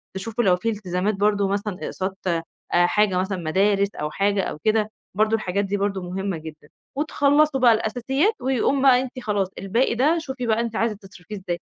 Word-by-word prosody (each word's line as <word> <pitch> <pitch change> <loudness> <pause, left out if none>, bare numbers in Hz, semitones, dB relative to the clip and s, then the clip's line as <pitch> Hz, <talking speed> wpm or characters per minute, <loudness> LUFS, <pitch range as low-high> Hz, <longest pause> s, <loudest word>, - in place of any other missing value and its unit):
تشوفوا 225 +4 -2
لو 185 -4 +4
في 180 +6 -2
التزامات 200 -1 -1
برضه 205 0 +2
مثلًا 200 -1 -2
إقساط 190 0 -4
آآ 165 -2 0 0.3
حاجة 185 +2 +3
مثلًا 190 +1 -2
مدارس 195 +4 +1
أو 150 0 -3
حاجة 200 +3 +1
أو - - -4
كده، 215 -1 +2 0.3
برضه 215 +2 +3
الحاجات 200 -2 -1
دي 200 +1 -1
برضه 195 -1 -1
مُهمّة 190 0 -3
جدًا 155 -1 -11 0.3
وتخلّصوا 290 0 +2
بقى 245 -2 +6
الأساسيات 250 - 0
ويقوم 265 +1 +1
بقى 260 -2 +6
أنتِ 255 0 -6
خلاص، 205 -5 -1
الباقي 230 +6 +1
ده 295 +8 +3
شوفي 265 -5 -5
بقى 220 0 +2
أنتِ 230 -1 -4
عايزة 225 -1 0
تصرفيه 195 +1 -11
إزاي. 180 -3 -4
205 Hz, 185 wpm, -23 LUFS, 190-235 Hz, 0.3 s, بقى